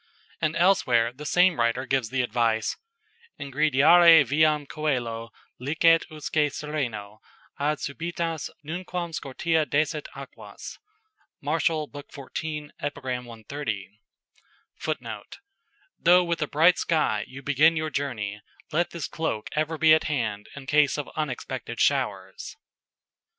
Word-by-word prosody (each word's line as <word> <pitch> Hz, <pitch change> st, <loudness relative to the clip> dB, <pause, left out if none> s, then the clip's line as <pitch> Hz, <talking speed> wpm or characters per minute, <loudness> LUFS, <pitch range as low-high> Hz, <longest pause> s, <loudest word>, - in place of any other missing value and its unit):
And 155 Hz, +1 st, 0 dB
elsewhere 125 Hz, -11 st, +3 dB
the 150 Hz, +3 st, -8 dB
same 180 Hz, -2 st, +4 dB
writer 115 Hz, +2 st, +1 dB
gives 130 Hz, -3 st, 0 dB
the 130 Hz, 0 st, 0 dB
advice: 115 Hz, -2 st, 0 dB, 0.6 s
"Ingrediare 150 Hz, +3 st, +6 dB
viam 150 Hz, +2 st, +2 dB
coelo 120 Hz, -7 st, -2 dB, 0.3 s
licet 160 Hz, +5 st, +3 dB
usque 150 Hz, -1 st, -1 dB
sereno 120 Hz, -10 st, -4 dB, 0.4 s
Ad 150 Hz, +2 st, +1 dB
subitas 165 Hz, +2 st, -3 dB, 0.2 s
nunquam 175 Hz, +1 st, -4 dB
scortea 160 Hz, +3 st, 0 dB
desit 150 Hz, +1 st, 0 dB
aquas." -, -, -10 dB, 0.6 s
Man'., 150 Hz, +4 st, -1 dB, 0.3 s
lib. 145 Hz, -1 st, -9 dB
xiv. 150 Hz, +2 st, -6 dB
Ep. 145 Hz, 0 st, -3 dB
130. 125 Hz, -4 st, -5 dB, 0.8 s
[Footnote: -, -, -5 dB, 0.6 s
"Though 180 Hz, +1 st, +6 dB
with 170 Hz, -1 st, -2 dB
a 150 Hz, -, 0 dB
bright 165 Hz, +5 st, +4 dB
sky 130 Hz, -11 st, +1 dB
you 135 Hz, +1 st, -10 dB
begin 150 Hz, +4 st, +4 dB
your 155 Hz, 0 st, -2 dB
journey, 110 Hz, -8 st, -3 dB, 0.3 s
let 170 Hz, +3 st, +1 dB
this 170 Hz, -3 st, -5 dB
cloak 135 Hz, -10 st, -3 dB
ever 155 Hz, +1 st, -1 dB
be 160 Hz, 0 st, +6 dB
at 155 Hz, -, +3 dB
hand 115 Hz, -9 st, -2 dB
in 140 Hz, -1 st, -9 dB
case 145 Hz, 0 st, +3 dB
of 150 Hz, -, -5 dB
unexpected 130 Hz, -5 st, -4 dB
showers." 100 Hz, -9 st, -1 dB
145 Hz, 120 wpm, -26 LUFS, 125-160 Hz, 0.8 s, Ingrediare